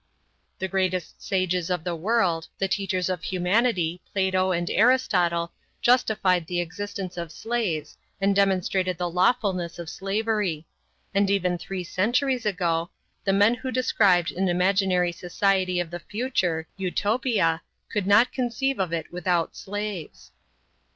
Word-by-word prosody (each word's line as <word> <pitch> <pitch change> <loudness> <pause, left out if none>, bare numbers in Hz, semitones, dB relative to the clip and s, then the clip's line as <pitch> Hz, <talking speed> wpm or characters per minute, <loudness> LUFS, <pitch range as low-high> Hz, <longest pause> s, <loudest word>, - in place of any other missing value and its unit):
The 190 - -2
greatest 185 -2 -1
sages 185 -2 0
of 180 -3 -1
the 175 0 -2
world, 175 -3 +1
the 195 - 0
teachers 190 -2 -1
of 185 -3 -2
humanity, 180 -2 +1
Plato 190 -1 +1
and 175 -1 -1
Aristotle, 180 -9 +2 0.3
justified 200 -8 +2
the 175 -1 -1
existence 185 +1 -5
of 170 -2 -5
slaves 185 -8 -3 0.2
and 195 0 +2
demonstrated 190 -2 +1
the 175 0 -1
lawfulness 185 -1 +1
of 170 -1 -6
slavery; 195 -4 -1 0.5
and 200 0 +2
even 185 -3 +1
three 185 +1 -5
centuries 240 +6 0
ago, 170 -4 0 0.4
the 195 - +3
men 205 +4 +5
who 260 +2 -5
described 200 -8 +3
an 190 +1 0
imaginary 180 0 +2
society 185 +1 0
of 175 -2 -3
the 175 - -5
future, 185 -8 -1
Utopia, 195 -2 +1 0.3
could 205 -3 -1
not 205 +5 +5
conceive 260 +1 -1
of 185 -3 0
it 165 0 -4
without 180 -2 0
slaves. 205 -4 -6
185 Hz, 135 wpm, -25 LUFS, 175-205 Hz, 0.5 s, men